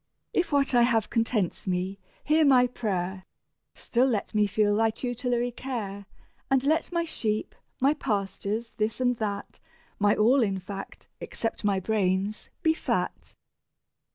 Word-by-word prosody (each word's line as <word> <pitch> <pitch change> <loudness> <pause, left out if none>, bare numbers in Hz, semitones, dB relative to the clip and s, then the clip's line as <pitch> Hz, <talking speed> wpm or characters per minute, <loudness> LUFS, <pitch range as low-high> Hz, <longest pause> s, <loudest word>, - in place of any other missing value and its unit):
If 355 - +1
what 280 -1 +2
I 240 - +6
have 230 -3 +2
contents 225 -6 0
me, 185 +2 -1 0.2
hear 310 +2 +4
my 260 -4 +6
prayer: 190 -6 -3 0.5
Still 250 +2 +1
let 225 -5 -1
me 210 -1 +3
feel 205 +1 +2
thy 225 +1 +3
tutelary 245 +1 -1
care, 210 -6 -5 0.4
And 270 -1 +3
let 315 +5 +1
my 340 -1 +1
sheep, 215 -9 -2 0.3
my 275 +3 +4
pastures, 210 -2 -2
this 215 +2 -1
and 245 -1 +2
that, 205 -2 -4 0.4
My 205 0 +4
all, 245 +6 +4
in 195 -4 +1
fact, 195 +1 -8
(except 225 - -4
my 200 -2 +2
brains,) 195 0 0
be 320 -2 +4
fat. - - -3
220 Hz, 145 wpm, -27 LUFS, 200-250 Hz, 0.5 s, I